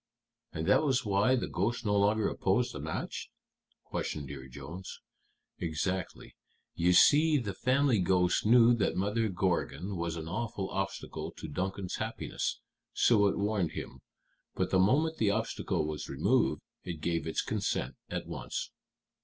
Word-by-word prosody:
"And 80 +1 -3
that 105 - +5
was 135 -4 +1
why 105 +5 +3
the 125 - -1
ghost 115 +6 -1
no 105 -1 +2
longer 105 +1 +3
opposed - - +1
the - - -6
match?" - - -4 0.5
questioned 70 -3 -4
Dear 65 -2 -8
Jones. 70 +8 -8 0.6
"Exactly. 90 +3 -3 0.4
You 90 +2 +2
see, 150 - +6
the 105 -7 -3
family 130 +1 +2
ghost 90 -1 +2
knew 120 +2 +6
that 100 - +1
Mother 105 +4 0
Gorgon 95 -1 -1
was 85 -1 -2
an 80 -1 -6
awful 100 +1 -3
obstacle 95 0 -4
to - - -6
Duncan's 95 +4 -3
happiness, - - -3 0.3
so 105 -4 +4
it 100 - 0
warned 100 -5 0
him. - - -7 0.5
But - - -1
the 95 - +4
moment 150 +12 +3
the 110 - +3
obstacle 110 -6 -1
was 75 -1 -5
removed, - - +1 0.2
it 85 -3 -5
gave 85 +1 -1
its 80 - -1
consent - - -1 0.2
at - - -3
once." - - -5
95 Hz, 150 wpm, -31 LUFS, 85-115 Hz, 0.6 s, see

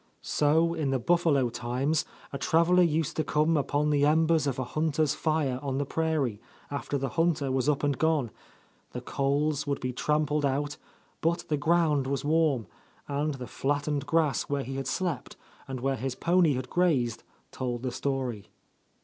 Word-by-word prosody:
So 160 +3 +2
in 150 -4 -1
the 135 - +1
buffalo 145 -2 +2
times 130 +7 -1 0.3
a 140 - -3
traveller 170 +2 +4
used 160 -3 +1
to 155 - +2
come 155 +3 +2
upon 145 +1 +1
the 145 -1 +2
embers 160 0 +3
of 135 - -1
a 130 - -1
hunter's 155 +2 0
fire 155 -5 0
on 135 -2 -2
the 145 - 0
prairie, 145 -8 -1 0.3
after 145 0 -2
the 135 0 -2
hunter 165 -5 +1
was 130 +2 +1
up 150 -1 0
and 145 -1 +2
gone; 155 -7 +1 0.6
the - - -4
coals 145 +2 0
would 140 -1 -1
be 125 0 -3
trampled 150 +2 0
out, 145 +1 -1 0.4
but 165 +1 0
the 150 - +2
ground 150 -2 +2
was 140 0 -2
warm, 150 -6 +2 0.4
and 145 +1 -1
the 125 -2 -6
flattened 145 +3 -2
grass 155 -2 +1
where 140 -1 -1
he 135 +3 -6
had 135 -1 -3
slept 155 -4 -2 0.3
and 135 -1 -5
where 135 +1 0
his 130 +2 -3
pony 170 -1 +3
had 130 0 -4
grazed, 135 -9 +1 0.3
told 125 -1 -3
the 130 - -1
story. 130 -5 -3
145 Hz, 175 wpm, -28 LUFS, 135-155 Hz, 0.6 s, traveller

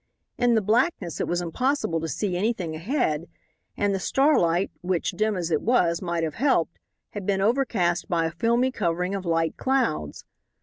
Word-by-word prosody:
In 245 -1 +2
the 220 - +2
blackness 220 - 0
it - - -1
was 175 0 0
impossible 175 - 0
to 165 - -3
see 180 +5 -2
anything 185 -4 -1
ahead, 170 - -1 0.5
and 205 -1 +1
the 195 - -1
starlight, 185 - +2
which, 180 -1 -1
dim 215 -2 0
as 175 -1 -3
it 155 - +2
was, 175 -8 +2
might 170 -2 -2
have 155 -2 -2
helped, 260 - +1 0.3
had 205 - -6
been 195 -1 +1
overcast 200 -6 +1
by 170 -3 +1
a 165 - -1
filmy 235 +8 +1
covering 180 -4 -1
of 190 -2 -4
light 165 -1 0
clouds. 245 - -1
185 Hz, 175 wpm, -25 LUFS, 170-235 Hz, 0.5 s, In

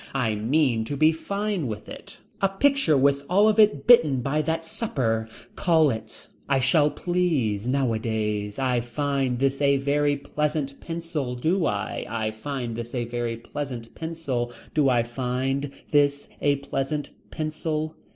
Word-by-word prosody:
I 120 -5 +1
mean 120 +2 +1
to 140 +5 -4
be 155 +2 +5
fine 200 0 -2
with 105 -2 -6
it. - - -10 0.2
A 195 - +3
picture 195 - +3
with 140 +1 +3
all 200 +4 +5
of 215 0 +3
it 215 -1 +4
bitten 155 - +6
by 140 +4 0
that 165 +1 -2
supper. 115 - -1 0.3
Call 160 -4 +3
it. 110 -1 -7 0.2
I 140 - +4
shall 145 +3 +4
please. 150 - 0
Nowadays. 110 -5 -1
I 130 -2 +1
find 130 +1 -1
this 135 +2 0
a 140 -1 +4
very 145 +1 +1
pleasant 145 -1 -2
pencil. 165 -6 -3
Do 165 +8 +1
I. 105 +1 -3
I 110 0 -1
find 120 +1 -4
this 120 +2 -6
a 120 -1 -1
very 120 -1 -3
pleasant 120 -1 -6
pencil. 150 -7 -3 0.2
Do 145 -3 +3
I 120 -2 +3
find 130 +3 -2 0.2
this 145 -1 +2
a 145 -1 +3
pleasant 140 +1 -3 0.2
pencil. 155 0 -3
140 Hz, 150 wpm, -25 LUFS, 120-155 Hz, 0.3 s, bitten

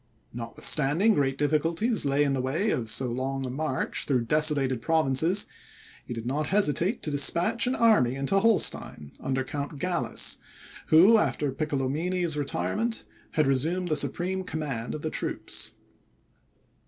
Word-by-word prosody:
Notwithstanding 145 - +1
great 135 -5 0
difficulties 165 +9 +1
lay 140 +1 +2
in 140 -1 0
the 135 - -1
way 160 +12 -1
of 115 -6 -3
so 130 +4 +2
long 135 +2 -3
a 125 - -5
march 140 0 -2
through 130 -4 0
desolated 140 -3 +2
provinces, 160 - +2 0.6
he - - -12
did 115 -1 -5
not 145 +4 -2
hesitate 195 - +1
to 155 - -2
despatch 175 - +2
an 255 - 0
army 175 - +3
into 140 +9 0
Holstein 195 - +1
under 130 0 -2
Count 145 +2 -6
Gallas, 180 +5 0 0.5
who, 190 +8 +6
after 145 -8 -1
Piccolomini's 155 +5 -2
retirement, 145 - -2 0.3
had 155 - +2
resumed 160 +7 0
the 155 - +1
supreme 175 +7 0
command 145 -9 -4
of 150 - -8
the 155 - -3
troops. - - -2
150 Hz, 140 wpm, -26 LUFS, 135-175 Hz, 0.6 s, who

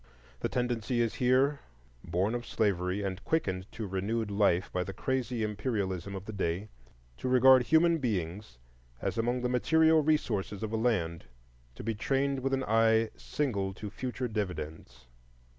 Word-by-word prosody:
The - - -1
tendency 120 -1 -1
is 115 -2 +1
here, 130 +3 +3 0.4
born 95 +6 0
of 120 0 -4
slavery 95 -1 0
and 95 -1 -4
quickened 95 - -1
to 110 - -4
renewed 100 +3 -2
life 100 -3 +2
by 90 - 0
the 95 - -6
crazy 125 -1 -1
imperialism 100 -3 -2
of 95 0 -7
the 110 - -6
day, 95 +1 -2 0.5
to 130 - -3
regard 130 0 +7
human 165 +1 +4
beings 95 - -3 0.4
as - - -2
among 120 +2 0
the 125 - 0
material 160 +6 +4
resources 110 -10 0
of 110 0 -3
a - - +2
land 100 -8 0 0.5
to - - -8
be 115 +2 -1
trained 135 +5 0
with 135 +1 -1
an 135 - -2
eye 110 0 +3
single 100 -10 -2
to 105 0 -7
future 125 +2 -3
dividends. 80 - -5
110 Hz, 160 wpm, -30 LUFS, 95-125 Hz, 0.5 s, regard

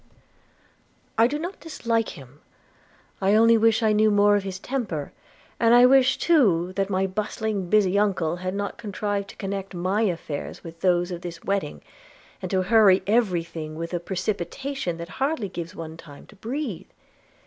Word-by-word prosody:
'I 230 - +6
do 290 +4 -2
not 350 +5 -6
dislike 230 -8 -2
him 135 +2 -15 0.4
– - - -33
I 195 +2 +3
only 230 +1 +6
wish 225 +1 +3
I 215 -1 +3
knew 215 +1 +4
more 205 0 +4
of 205 - +1
his 190 -1 -5
temper; 195 - -4 0.5
and 230 +1 +5
I 245 +1 +8
wish 265 0 +5
too 190 - +3
that 195 0 0
my 190 0 +1
bustling 205 0 -3
busy 200 -1 +3
uncle 180 -5 0
had 185 +1 -4
not 200 0 -4
contrived 205 -1 -3
to - - -11
connect 195 -1 -5
my 185 +5 0
affairs 165 -8 -3
with 165 0 -10
those 175 -1 +2
of 175 -1 -5
this 170 -2 -8
wedding, 200 0 -2 0.6
and - - -4
to 190 -2 +1
hurry 200 -2 +5
every 200 -6 +2
thing 155 -2 -7
with 165 +2 -5
a 175 - 0
precipitation 190 +3 -3
that 170 0 -7
hardly 270 -7 0
gives 170 -2 -7
one 160 -1 -7
time 145 -4 -13
to 215 - -18
breathe. 230 - -5
200 Hz, 175 wpm, -24 LUFS, 175-220 Hz, 0.6 s, I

